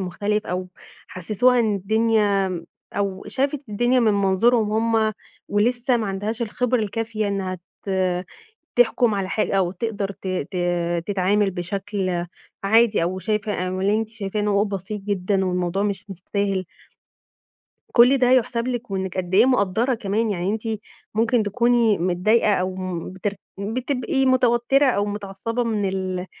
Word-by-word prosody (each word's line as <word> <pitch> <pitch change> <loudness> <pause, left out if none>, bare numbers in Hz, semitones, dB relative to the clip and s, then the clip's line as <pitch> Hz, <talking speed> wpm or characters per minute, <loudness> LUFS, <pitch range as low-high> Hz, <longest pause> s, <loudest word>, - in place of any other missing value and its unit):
مختلف 205 +3 -2
أو 185 +1 -3 0.4
حسّسوها 215 +8 +2
إن 220 -3 +1
الدنيا 210 -1 +2
م 170 -2 -5 0.3
أو 195 -1 -2
شافت 275 +1 -1
الدنيا 240 +5 +2
من 220 -3 +3
منظورهم 210 +3 +2 0.2
هم 220 -1 +2 0.4
ولسّه 240 +4 +2
ما 225 - -2
عندهاش 205 +4 -3
الخبرة 250 +2 0
الكافية 220 0 -2
إنّها 190 -2 -2 0.2
ت 200 - -5 0.9
تحكُم 240 -1 +4
على 195 -2 -2
حا 215 - 0
أو 190 -3 +2
تقدر 200 0 -3
ت 195 - -12 0.2
ت 190 - -5 0.5
تتعامل 200 +1 +2
بشكل 185 0 -3 0.4
عادي 225 -1 +4
أو 180 +3 -1
شايفة 210 -2 -1
أمّا 185 0 -3
اللي 200 +2 +3
أنتِ 220 0 0
شايفاه 215 -2 -4
إن 210 - 0
هو 200 0 +3
بسيط 200 +1 -4
جدًا 195 -1 0
والموضوع 180 +1 -1
مش 200 -2 -2
مستاهل. 195 +1 -2 1.3
كل 250 +3 +6
ده 250 -1 +3
يُحسَب 245 -1 +2
لِك 245 -2 -4
وإنِّك 190 -1 -3
قد 180 0 -2
إيه 220 +5 +6
مقدّرة 240 0 +2
كمان. 220 0 -1
يعني 185 -1 -1
أنتِ 220 0 -3 0.5
ممكن 230 +1 +2
تكوني 235 0 +2
متضايقة 185 +5 +2
أو 185 0 -1
م 185 -2 -5
بتر 190 +2 -2 0.3
بتبقي 255 - -1
متوتّرة 255 +2 +3
أو 205 -6 +2
متعصّبة 205 +3 -3
من 210 -4 0
ال 185 -1 -3
205 Hz, 150 wpm, -23 LUFS, 190-230 Hz, 1.3 s, كل